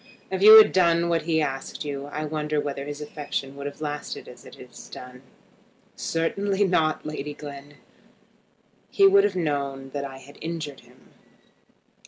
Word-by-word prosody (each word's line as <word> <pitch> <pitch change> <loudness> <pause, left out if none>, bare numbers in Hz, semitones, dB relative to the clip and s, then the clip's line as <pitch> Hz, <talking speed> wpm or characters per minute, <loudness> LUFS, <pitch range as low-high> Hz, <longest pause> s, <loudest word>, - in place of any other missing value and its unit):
If 190 0 -2
you 215 +2 +11
had 220 - +8
done 170 -2 +3
what 170 -1 +1
he 160 -1 +2
asked 135 +2 -4
you 140 -1 -5
I 155 +1 -4
wonder 150 0 -2
whether 140 -1 -4
his 145 0 -6
affection 145 -2 -5
would 140 0 -6
have 145 - -9
lasted 150 -1 -5
as - - -13
it - - -13
has - - -13
done." 125 0 -11 0.7
"Certainly 195 +5 -1
not, 160 -5 +1
Lady 150 -1 -5
Glen. 145 0 -10 1.1
He 395 - +4
would 395 0 +6
have - - -1
known 140 -5 -2
that 140 0 -4
I 135 -1 -7
had 140 +2 -15
injured 160 -4 -5
him." 125 +2 -22
150 Hz, 165 wpm, -25 LUFS, 140-165 Hz, 1.1 s, you